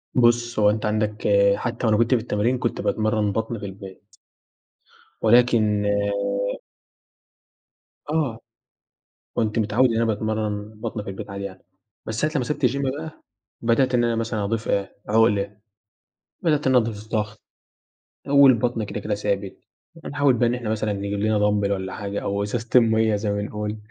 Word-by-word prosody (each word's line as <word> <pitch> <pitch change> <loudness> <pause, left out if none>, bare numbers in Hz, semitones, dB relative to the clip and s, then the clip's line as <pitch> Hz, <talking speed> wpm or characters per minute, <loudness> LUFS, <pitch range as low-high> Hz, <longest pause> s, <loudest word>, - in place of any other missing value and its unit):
بُص، 120 -1 +3
هو 105 -1 +5
أنت 105 +1 -1
عندك 105 0 -1 0.3
حتّى 120 +2 -3
وأنا 105 - +3
كنت 115 +3 +3
في 120 - 0
التمرين، 115 +2 0
كنت 120 -1 -2
باتمرّن 110 -1 0
بَطْن 110 +2 -3
في 100 - -6
البيت. 95 +1 -11 1.1
ولكن 110 -3 +4 2.2
آه. 150 -8 -1 1.0
كنت 110 -1 0
متعوِّد 115 +4 +3
إن 115 - -1
أنا 115 - +2
باتمرَّن 110 -1 -2
بَطْن 105 - -4
في 100 - -6
البيت 95 +1 -8
عادي 100 0 -5
يعني، 95 -1 -9 0.4
بس 110 - -3
ساعة 155 - 0
لمّا 130 - 0
سِبت 150 +1 0
الgym 135 +3 -1 0.2
بقى، 160 0 -9 0.4
بدأت 125 +2 +2
إن 120 -1 +3
أنا 115 -1 +1
مثلًا 110 -2 -2
أضيف 110 +2 -2
إيه، 100 -1 -1
عُقْلة، 105 -2 +2 0.9
بدأت 150 -5 +1
إن 130 - +3
أنا 125 - +5
أضيف 105 -1 -7
ضَغْط 110 -1 -3 0.9
آآ 140 - -7
والبَطْن 125 -5 +5
كده، 105 - -5
كده 105 +1 -2
ثابت. 100 -1 -2 0.5
فنحاول 145 -2 +2
بقى 120 0 +2
إن 120 - +1
إحنا 120 -3 -4
مثلًا 110 -1 -1
نجيب 100 0 -3
لنا 110 +1 +1
Dumbbell 105 -1 +1
والَّا 95 -1 -3
حاجة 100 -1 -4
أو 100 0 -1
إزازتين 115 +4 +2
مَيّة 110 -1 +2
زي 105 0 -2
ما 100 - -1
بنقول، 105 +1 -3
110 Hz, 165 wpm, -23 LUFS, 105-120 Hz, 2.2 s, هو